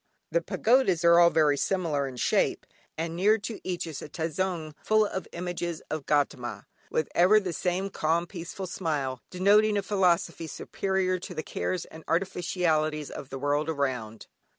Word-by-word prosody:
The - - +2
pagodas 220 - +2
are 170 0 +7
all 170 0 +7
very 150 -3 +3
similar 155 -6 0
in 130 - -7
shape, 120 - +1 0.3
and 165 +1 -3
near 205 +5 +4
to 215 +1 -6
each 180 -1 -3
is 160 -4 -6
a - - -8
tazoung 165 0 -2
full 215 0 +4
of 190 -2 -4
images 175 -1 -4
of 155 -3 -4
Gaudama, 140 -4 0 0.2
with 155 - 0
ever 185 +5 +6
the 185 -4 -4
same 185 +4 -1
calm 165 0 +1
peaceful 175 +2 -7
smile, 145 -8 -2
denoting 205 +3 +4
a 200 - 0
philosophy 180 -4 +1
superior 190 +2 -1
to 180 0 -8
the 155 - -3
cares 180 +2 -3
and 160 0 -12
artificialities 165 -4 0
of 140 - -8
the 135 - -5
world 145 +3 0
around. 125 -7 -2
170 Hz, 165 wpm, -28 LUFS, 155-190 Hz, 0.3 s, are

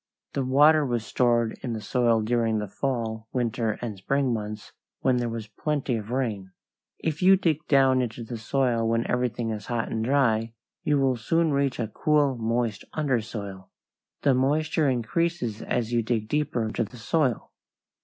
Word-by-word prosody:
The 140 - 0
water 150 +4 +5
was 120 -4 -1
stored 120 -2 +1
in 120 -3 -3
the 110 - -3
soil 115 0 +2
during 115 -1 +1
the 105 -1 -2
fall, 115 -1 -3
winter, 115 -3 -1
and 110 -4 -3
spring 135 +5 +1
months 105 -1 -5 0.3
when 130 -1 +3
there 120 -1 -1
was 115 -1 -5
plenty 135 +4 -2
of 110 -1 -5
rain. 110 -7 -2 0.4
If 160 0 -3
you 190 +1 +7
dig 160 -5 0
down 135 -2 +4
into 120 -1 -4
the 115 0 -6
soil 120 -2 +1
when 115 0 +1
everything 120 -2 -1
is 105 -2 -6
dry 120 -2 0
and 110 0 -3
hot, 130 -5 +3 0.4
you 150 -1 +2
will 135 -2 +2
soon 165 +7 +1
reach 140 -2 0
a 115 - -1
cool, 145 +4 +2
moist 115 -2 -1
undersoil. 110 -9 -3 0.5
The 140 - +4
moisture 150 +3 +2
increases 125 0 -1
as 120 -1 -2
you 120 - +3
dig 110 -1 -1
deeper 140 -3 0
into 110 +1 -1
the 120 +3 -10
soil. 125 +1 0
120 Hz, 170 wpm, -26 LUFS, 110-140 Hz, 0.5 s, you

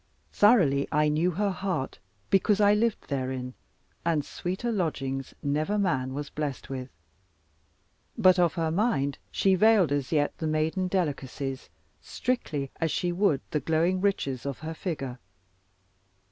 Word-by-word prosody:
Thoroughly 175 - +4
I 150 0 +3
knew 155 +4 +2
her 200 +3 0
heart, 185 -7 -3 0.3
because 195 +1 +3
I 205 0 +6
lived 220 +1 0
therein, 130 -2 -3 0.5
and 160 -4 +1
sweeter 190 +11 -3
lodgings 135 - -2
never 155 +8 0
man 130 -10 0
was 145 0 -5
blessed 145 -3 -4
with. 130 -1 -5 1.3
But 185 0 +5
of 175 -2 +3
her 165 -2 0
mind 160 - 0
she 195 - +2
veiled 200 -4 +5
as 145 -2 -1
yet 145 -2 +1
the 160 - -1
maiden 155 +4 0
delicacies, 140 -7 -3 0.3
strictly 155 - -2
as 165 - 0
she 175 +3 0
would 175 -6 +2
the 150 - +1
glowing 165 +4 +1
riches 140 -11 0
of 140 -2 -4
her 160 - -3
figure. 135 -8 -4
160 Hz, 140 wpm, -27 LUFS, 140-190 Hz, 1.3 s, I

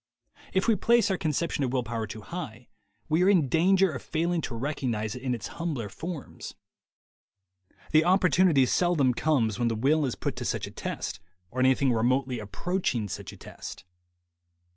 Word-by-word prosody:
If 190 +3 +1
we 225 - +5
place 235 +1 +3
our 190 - +1
conception 155 -1 -1
of 125 - -1
will 130 -2 0
power 115 -1 -3
too 110 +2 -8
high, 125 -5 -7 0.4
we 155 +3 +2
are 185 - +5
in 175 -8 +4
danger 185 +6 +3
of 130 -5 -6
failing 170 +1 -1
to 125 - -5
recognize 115 -5 -2
it 125 - -8
in 130 -1 -1
its 110 - -7 0.2
humbler 140 -11 -2
forms. 160 - -7 1.4
The 155 +1 +5
opportunity 180 -5 +4
seldom 145 -3 +2
comes 120 -7 +1
when 120 - +2
the 115 - 0
will 145 +7 +2
is 125 - -3
put - - -3
to - - -4
such - - -1
a - - -9
test, - - -5 0.3
or 130 - -5
anything 130 0 +3
remotely 125 +2 +1
approaching 110 - -2
such 90 - -6
a - - -13
test. - - -9
135 Hz, 175 wpm, -27 LUFS, 120-170 Hz, 1.4 s, we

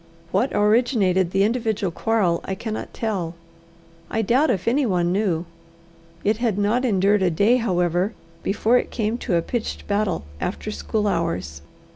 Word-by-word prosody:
What 260 - +1
originated 210 -4 +3
the 195 +2 +2
individual 220 -4 0
quarrel 195 -3 +1
I 190 - -3
cannot 215 +2 -5
tell. 185 -7 -3 0.7
I 225 - 0
doubt 260 +9 +3
if 195 -5 -1
anyone 205 -10 +2
knew. 185 -4 0 0.8
It 210 +1 +2
had 230 -4 0
not 210 +5 +1
endured 200 -2 +3
a 185 - +3
day, 205 +9 +3
however, 180 -2 0 0.3
before 220 +5 +2
it - - -4
came 220 +1 -2
to 190 - -1
a 170 - +2
pitched 235 +3 -4
battle 205 - 0 0.2
after 210 - -3
school 210 0 -1
hours. 165 - -2
205 Hz, 150 wpm, -23 LUFS, 185-225 Hz, 0.8 s, originated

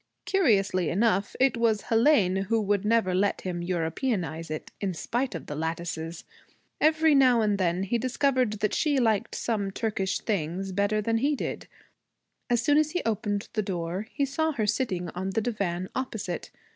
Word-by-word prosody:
Curiously 200 - +2
enough 200 0 +1
it 265 -1 +4
was 230 -3 +1
Hélène 220 -6 +3
who 225 +3 +1
would 205 -1 +1
never 215 -3 +2
let 195 +2 +1
him 175 -2 -3
Europeanize 175 - -2
it, 155 0 -6
in 190 -3 -1
spite 240 +5 -2
of 160 - -6
the 145 - -6
lattices. 165 +1 -4 0.6
Every 315 0 +4
now 255 -4 +5
and 210 -2 +1
then 180 0 +1
he 235 +5 0
discovered 255 -3 0
that 210 -1 +1
she 295 -3 +1
liked 225 -2 +1
some 210 -4 -1
Turkish 195 -2 -1
things 190 -1 -2
better 200 +2 +1
than 225 +1 +1
he 285 +4 +1
did. - - -5 0.8
As 240 -1 +2
soon 290 +3 +4
as 310 -1 +2
he 355 - -1
opened 210 -2 -1
the 215 - +1
door 185 +1 -3
he 280 - 0
saw 315 +4 -1
her 220 -6 -1
sitting 190 -6 -1
on 185 +3 -4
the 205 +4 0
divan 190 -6 -2
opposite. 220 -9 -4
210 Hz, 170 wpm, -27 LUFS, 185-240 Hz, 0.8 s, now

